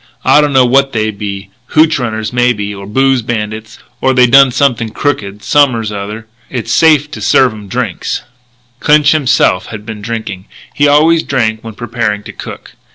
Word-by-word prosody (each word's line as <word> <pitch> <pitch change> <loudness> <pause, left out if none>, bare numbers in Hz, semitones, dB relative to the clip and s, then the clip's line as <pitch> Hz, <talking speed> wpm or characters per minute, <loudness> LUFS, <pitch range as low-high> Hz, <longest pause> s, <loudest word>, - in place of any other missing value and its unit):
"I 135 +3 +5
don't 150 -1 0
know 130 -2 +4
what 135 +2 +2
they 110 -1 0
be 100 -1 -7 0.2
hootch 155 -1 +4
runners 110 -2 -3
maybe 120 -5 0
or 100 -1 -9
booze 135 +3 +1
bandits 110 -1 -5 0.2
or 130 0 +2
they 125 -1 +5
done 135 +2 +6
something 120 -4 0
crooked 105 -7 -3
som'ers 125 -7 +2
r'other. 105 +2 -6 0.2
It's 125 -3 -4
safe 150 -2 +3
to 115 - -8
serve 120 +3 +3
'em 105 -2 -11
drinks." 120 -5 -3 0.6
Clinch 150 0 +4
himself 135 -11 +1
had 105 -2 -9
been 110 -2 -7
drinking. 110 -3 -6 0.3
He 145 - +2
always 160 +3 +4
drank 110 -7 -1
when 110 -2 -9
preparing 110 -3 -3
to - - -10
cook. - - -10
120 Hz, 170 wpm, -12 LUFS, 105-135 Hz, 0.6 s, done